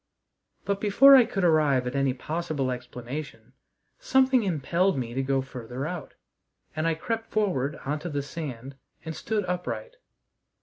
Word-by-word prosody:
But, 200 0 -1
before 270 +7 +7
I 255 -3 +7
could 195 -4 -3
arrive 150 -6 +3
at 125 +2 -3
any 135 -1 +2
possible 150 -2 -2
explanation, 125 0 -7 0.5
something 265 - +3
impelled 175 0 +1
me 120 -2 -3
to 135 - -1
go 135 0 0
farther 125 0 -6
out, 165 -2 -6 0.6
and 155 +1 0
I 165 - +1
crept 225 +7 -4
forward 155 -10 0
on 150 +2 -1
to 175 - -5
the 145 -2 -2
sand 135 -4 -7 0.3
and 160 0 -5
stood 215 -3 -2
upright. 180 - -4
155 Hz, 150 wpm, -27 LUFS, 130-195 Hz, 0.6 s, before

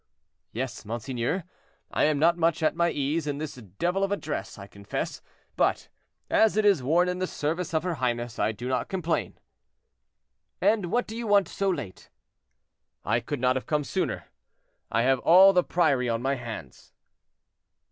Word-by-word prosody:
"Yes, 120 0 -4
monseigneur, 120 - -3 0.5
I - - +2
am 150 -1 +2
not 165 +4 +4
much 165 -1 +1
at 155 - +2
my 170 0 +2
ease 150 +2 -1
in 145 -1 -2
this 155 0 -5
devil 130 - -2
of 195 - 0
a 200 - +1
dress, 150 -8 -5
I 100 - -9
confess; 100 0 -5 0.3
but, - - +1 0.4
as 220 -1 +3
it 215 - +3
is 195 -8 +4
worn 165 +8 +3
in 180 0 -2
the 185 - -1
service 170 +5 -2
of 160 -1 0
her 180 -1 -1
highness, 120 -4 -2
I - - +2
do 115 +3 -7
not 130 0 -1
complain." 175 -4 -2 1.2
"And 210 -5 +2
what 240 +7 0
do 220 - -8
you 235 -1 -4
want 200 -3 +4
so 195 +2 -1
late?" 140 - -5 1.0
"I 115 +3 +2
could 145 +4 -4
not 130 +1 +1
come 150 -1 +1
sooner; 185 +6 -2 0.7
I 115 - +2
have 130 0 +3
all 190 +6 +7
the 180 -1 +4
priory 140 -9 +1
on 115 0 0
my 135 +1 +1
hands." 115 - -8
150 Hz, 175 wpm, -27 LUFS, 125-180 Hz, 1.2 s, all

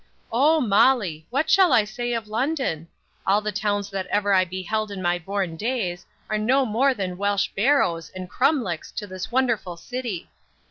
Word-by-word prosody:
0 300 +6 +4
Molly! 200 - +2
what 275 +5 0
shall 375 -2 +5
I 235 -4 +5
say 240 +3 -4
of 230 -2 -3
London? 230 - -1 0.4
All 195 +2 +4
the 210 0 -3
towns 205 0 -1
that 190 -2 -3
ever 205 0 +1
I 185 -1 +4
beheld 190 +4 -3
in 200 -1 -6
my 175 -1 0
born 190 -1 -3
days, 195 -5 -2 0.2
are 215 -1 -1
no 260 +5 +3
more 255 +4 +2
than 185 -4 -4
Welsh 200 0 +1
barrows 195 - +2
and 185 -1 -6
crumlecks 245 - 0
to 210 - -4
this 185 +2 -7
wonderful 235 -9 0
sitty! 235 -2 -5
210 Hz, 175 wpm, -24 LUFS, 185-250 Hz, 0.4 s, shall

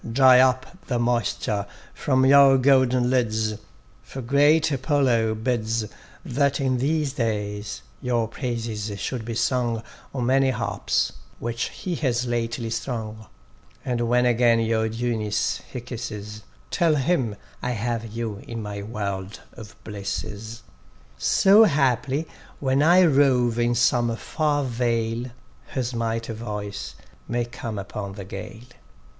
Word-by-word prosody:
Dry 130 +1 +7
up 130 +6 +2
the 125 - 0
moisture 110 -3 0 0.3
from 130 -2 +2
your 135 0 +7
golden 130 -2 +3
lids, 110 -4 +1 0.5
For 135 - -8
great 145 +5 +4
Apollo 130 -5 +2
bids 115 -1 -1 0.4
That 140 +2 +1
in 130 -2 +1
these 145 +1 0
days 105 -4 -3 0.2
your 120 -3 0
praises 115 -4 -4
should 115 +4 -3
be 115 0 -5
sung 120 -2 0 0.3
On 130 -3 -2
many 135 +1 +3
harps, 100 -5 -1 0.2
which 115 +1 -2
he 180 - -5
has 125 -4 0
lately 115 -1 -2
strung; 110 -2 -4 0.6
And 120 -2 -1
when 125 +1 +3
again 120 -1 +4
your 110 -1 +1
dewiness 110 -2 -1
he 125 - -4
kisses, 110 -3 -7 0.3
Tell 165 -3 +3
him, 135 -6 +1 0.3
I 125 - -1
have 115 0 -2
you 115 -2 -4
in 115 -1 -5
my 105 -2 -5
world 100 -2 -5
of 110 -3 -11
blisses: 105 +2 -5 0.6
So 200 - +6
haply 140 - +1 0.3
when 135 0 +1
I 175 +4 +6
rove 130 -6 +3
in 120 0 +2
some 120 -1 +2
far 145 +4 0
vale, 115 -2 -1 0.4
His 130 -2 -3
mighty 115 0 -2
voice 105 -2 -6 0.3
may 120 0 -1
come 120 -2 -6
upon 100 0 -5
the 100 -1 -8
gale. 100 +4 -8
120 Hz, 130 wpm, -24 LUFS, 110-130 Hz, 0.6 s, Dry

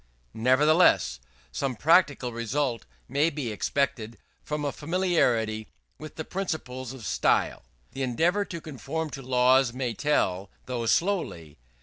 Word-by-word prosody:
Nevertheless, 130 - +4 0.3
some 135 -3 -2
practical 145 -3 +3
result 115 +1 -2 0.2
may 145 +5 +2
be 140 -7 -4
expected 115 0 -1 0.2
from 150 -1 -3
a 140 - 0
familiarity 140 - 0 0.3
with 155 0 -9
the 160 - -5
principles 130 -10 -4
of 130 -5 -9
style. - - +1 0.3
The 135 - -6
endeavour 165 - +1
to 170 - -6
conform 155 +3 -5
to 135 - -7
laws 130 0 +3
may 125 -2 -2
tell, 100 -11 0 0.2
though 120 -2 -3
slowly. 110 - -1
130 Hz, 125 wpm, -27 LUFS, 115-155 Hz, 0.3 s, Nevertheless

